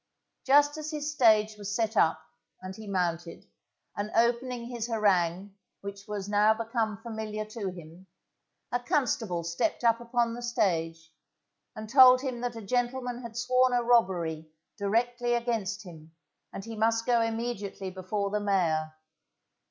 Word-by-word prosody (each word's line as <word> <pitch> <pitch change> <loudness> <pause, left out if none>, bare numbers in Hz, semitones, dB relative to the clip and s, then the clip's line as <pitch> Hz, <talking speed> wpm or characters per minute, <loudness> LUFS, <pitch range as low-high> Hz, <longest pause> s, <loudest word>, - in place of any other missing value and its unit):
Just 290 +2 +4
as 310 0 -5
his 300 -1 -3
stage 215 -5 +4
was 205 0 -4
set 225 -1 -1
up, 160 -4 +3 0.4
and 185 0 -8
he 220 0 -10
mounted, 175 -3 -2 0.5
and 205 +1 -3
opening 235 +1 +1
his 240 -2 -4
harangue 195 -4 +1 0.3
which 200 0 -8
was 205 -2 -4
now 210 +1 +4
become 225 -2 -2
familiar 220 -1 -5
to 215 -2 -5
him, 175 +1 -12 0.6
a 245 - +1
constable 230 -9 -1
stepped 170 - -1
up 230 -1 +4
upon 235 -1 0
the 240 - -7
stage, 165 -8 -1 0.6
and 215 0 -7
told 255 +1 +7
him 255 -3 -4
that 245 -1 -3
a 225 - -7
gentleman 245 +2 -2
had 230 -2 -8
sworn 255 +1 +2
a 245 -1 +2
robbery 175 -9 +1 0.3
directly 240 +4 0
against 230 -6 -2
him, 165 -3 -13 0.4
and 195 - -7
he 230 0 -7
must 225 +1 +1
go 240 -2 +3
immediately 225 -4 -3
before 195 +2 -3
the 210 - 0
mayor. 165 -6 0
220 Hz, 150 wpm, -28 LUFS, 190-240 Hz, 0.6 s, told